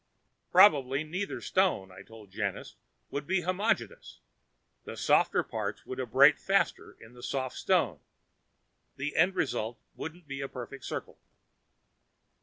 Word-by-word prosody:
"Probably 145 -7 +5
neither 180 +6 -4
stone," 180 - +1
I - - -12
told 110 -3 -14
Janus, 100 -1 -4 0.4
"would 145 0 -4
be 190 0 +1
homogenous. 185 - -1 0.7
The - - -8
softer - - +3
parts - - -5
would 130 - -6
abrade 135 +4 +5
faster 195 0 0
in 110 +2 -15
the 120 - -14
soft 130 0 -3
stone. 140 - +1 1.0
The 145 +2 -3
end 180 +4 +3
result 120 -8 -2 0.2
wouldn't 165 +2 -8
be 135 -1 -5
a 135 - -3
perfect 130 0 -8
circle." - - -6
140 Hz, 130 wpm, -30 LUFS, 120-180 Hz, 1.0 s, Probably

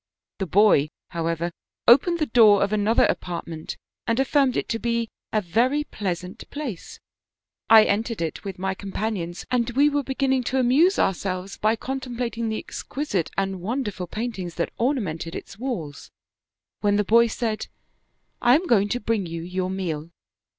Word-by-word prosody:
" 90 0 -67
The 190 - -2
boy, 180 -5 +4 0.2
however, 170 0 -2 0.4
opened 285 +9 +6
the 310 - +1
door 220 -5 +6
of 200 +1 -1
another 215 +2 +3
apart 175 -2 -2
ment 160 -1 -6 0.3
and 230 +2 +1
affirmed 270 -1 +2
it - - -1
to 225 - -1
be 235 -1 -1 0.2
a 215 - +1
very 245 - +1
pleasant 185 - -5
place; 275 - -6 0.7
I 220 -1 +9
entered 220 +3 -1
it 165 -2 -3
with 195 -2 -6
my 190 +1 -1
companions, 195 -3 -4
and 245 -2 +1
we 280 +5 +3
were 290 0 +1
beginning 265 -1 0
to 260 - 0
amuse 285 +10 +4
ourselves 190 0 -1
by 215 +2 +2
contemplating 240 -2 -3
the 220 - -2
exquisite 235 - -3
and 195 -2 -1
wonderful 205 -4 -3
paintings 195 -4 -4
that 170 - -2
ornamented 200 - -1
its 195 - -8
walls, 175 - -5 0.7
when 205 -1 +2
the 210 - +2
boy 230 +3 +5
said, 225 -1 -2 0.4
* - - -47
I 245 +1 +6
am 335 +5 +1
going 205 - +3
to 245 - -1
bring 210 -4 -1
you 165 0 -5
your 185 +1 -2
meal.' 170 -5 -3
215 Hz, 165 wpm, -24 LUFS, 185-245 Hz, 0.7 s, I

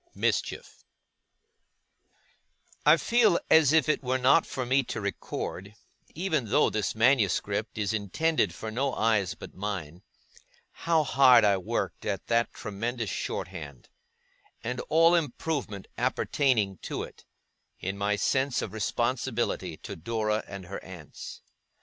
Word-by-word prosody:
MISCHIEF - - -2 2.0
I - - +8
feel 230 -7 +3
as 160 -4 +6
if 160 -3 +4
it 155 - +1
were 130 0 +1
not 130 +6 +4
for 130 - -3
me 130 +3 +3
to 115 - -4
record, 100 0 -5 0.4
even 160 -6 0
though 135 +8 +3
this 110 -1 -1
manuscript 110 -3 +1
is 105 0 -1
intended 110 - 0
for 110 +6 -6
no 135 +4 -1
eyes 110 -5 +1
but - - -11
mine, 95 -4 -5 0.7
how 165 -2 +1
hard 130 -5 +6
I 100 -1 +4
worked 90 - -3
at 100 -2 -3
that 115 0 +2
tremendous 115 +2 -4
short - - -3
hand, 70 -5 -10 0.7
and 125 +2 -3
all 165 +2 +5
improvement 145 - -2
appertaining 110 - +1
to - - -4
it, - - -12 0.6
in 95 +2 -3
my 100 +1 0
sense 130 +6 0
of 100 - -6
responsibility 120 -5 -1
to - - -6
Dora 110 +3 -1
and 100 -2 -8
her 100 +2 -7
aunts. 90 -5 -10
115 Hz, 130 wpm, -28 LUFS, 100-135 Hz, 2.0 s, I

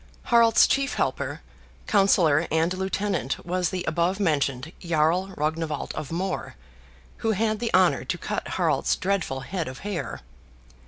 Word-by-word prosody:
Harald's 230 -1 +6
chief 275 0 0
helper, - - -2 0.4
counsellor, 170 -6 +3
and 160 +3 +1
lieutenant 190 -5 -2
was 180 0 0
the 185 -1 -4
above 170 +5 +1
mentioned 145 -5 0
Jarl 170 +2 +1
Rognwald 155 0 -2
of 150 - -6
More, 185 +3 -3 0.6
who 225 -1 0
had 215 +1 0
the 235 0 -1
honor - - +4
to - - -2
cut - - -4
Harald's - - +2
dreadful 185 -9 -1
head 170 +5 -4
of 130 0 -8
hair. 205 -4 -4
180 Hz, 140 wpm, -25 LUFS, 155-200 Hz, 0.6 s, Harald's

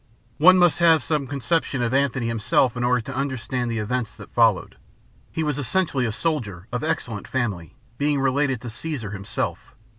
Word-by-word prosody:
One 185 +4 +8
must 175 -2 +4
have 165 -2 +5
some 150 -4 -1
conception 140 -1 -1
of 120 +1 -1
Antony 135 -3 +1
himself 115 +2 +1
in 120 - -2
order 125 0 +2
to - - -7
understand 130 -2 -2
the 115 - -2
events 115 +1 -2
that - - -13
followed. - - +2 0.5
He 160 - -2
was 150 -2 -1
essentially 145 -3 0
a - - -1
soldier, 105 - -3
of 125 -1 -3
excellent 105 -4 -3
family, 100 - -3 0.2
being 145 0 +1
related 135 -2 +1
to 120 - -6
Caesar 125 -5 -5
himself. 115 +5 -4
130 Hz, 175 wpm, -23 LUFS, 115-145 Hz, 0.5 s, One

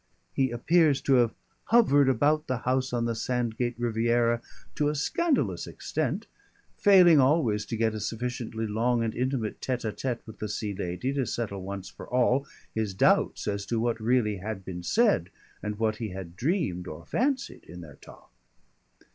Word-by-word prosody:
He 135 -1 +1
appears 145 +4 +3
to 135 - +2
have 120 -2 +2 0.3
hovered 145 - +5
about 150 +5 +2
the 130 - 0
house 130 +1 +1
on 120 -1 0
the 115 - 0
Sandgate 120 +1 -2
Riviera 120 0 +1 0.3
to 145 0 +1
a 150 - -2
scandalous 300 - 0
extent, - - -3 0.5
failing 180 -6 +6
always 130 -7 +2
to 115 - -3
get 110 -1 +1
a 110 - -4
sufficiently 115 0 -3
long 115 +3 +1
and 110 -1 -2
intimate 125 -3 -2
tête 125 -2 -2
à 105 - -3
tête 125 -3 -3
with 110 -1 -12
the 105 - -4
Sea 105 0 -3
Lady 95 +7 -3
to 135 -3 -1
settle 100 -5 -3
once 95 0 -6
for - - -11
all 125 +2 +2 0.3
his 110 -4 -2
doubts - - +2
as 100 -1 -1
to 115 - 0
what 115 0 0
really 110 -3 +2
had 95 0 -6
been 90 -2 -6
said 205 - +2 0.3
and 105 0 -4
what 110 -1 0
he 110 -2 -4
had 90 -2 -8
dreamed 120 - -1
or 80 0 -8
fancied 270 - -1
in 90 +2 -10
their 75 -4 -12
talk. - - -16
120 Hz, 175 wpm, -27 LUFS, 105-135 Hz, 0.5 s, failing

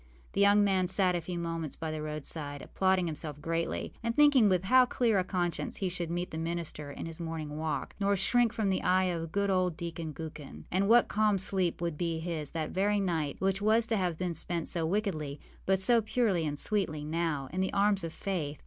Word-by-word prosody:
The 200 - +1
young 205 +1 +6
man 190 -2 +2
sat 185 0 +2
a 175 - -1
few 175 +2 -5
moments 165 -3 -3
by 160 -1 -4
the 155 -1 -4
roadside, 150 -1 -5
applauding 190 -1 +1
himself 155 -2 -5
greatly, 165 +2 -2
and 230 0 -2
thinking 290 -7 +6
with 185 -1 +2
how 255 +5 +5
clear 230 -6 +2
a - - +1
conscience 180 -2 -2
he 190 - -1
should 175 -2 -4
meet 175 +1 -3
the 160 - -4
minister 165 -3 -4
in 140 - -6
his 165 0 -7
morning 160 -3 -5
walk, 155 0 -3
nor 200 0 +2
shrink 235 +4 +3
from 220 -4 -1
the 190 - +1
eye 185 +1 +3
of 165 -3 -2
good 200 +1 +1
old 180 -3 +1
Deacon 165 -2 -5
Gookin. 150 -2 -8
And 195 +3 +1
what 240 +1 +6
calm 210 -1 +2
sleep 185 -2 0
would 170 -3 -2
be 170 -2 -1
his 160 -3 -4
that 160 -2 -3
very 205 +2 +1
night, 165 -7 -1
which 195 +1 0
was 220 +2 +3
to 225 - 0
have 180 -4 -1
been 180 -1 -2
spent 170 +1 -3
so 165 -2 -1
wickedly, 160 -7 -2 0.3
but 190 0 +3
so 230 +4 +5
purely 215 -7 +1
and 145 0 -3
sweetly 160 -6 -1
now, 155 -3 -1
in 185 - 0
the 190 - 0
arms 200 -1 +2
of 165 - -3
Faith! 160 -6 -3
175 Hz, 220 wpm, -30 LUFS, 160-200 Hz, 0.3 s, young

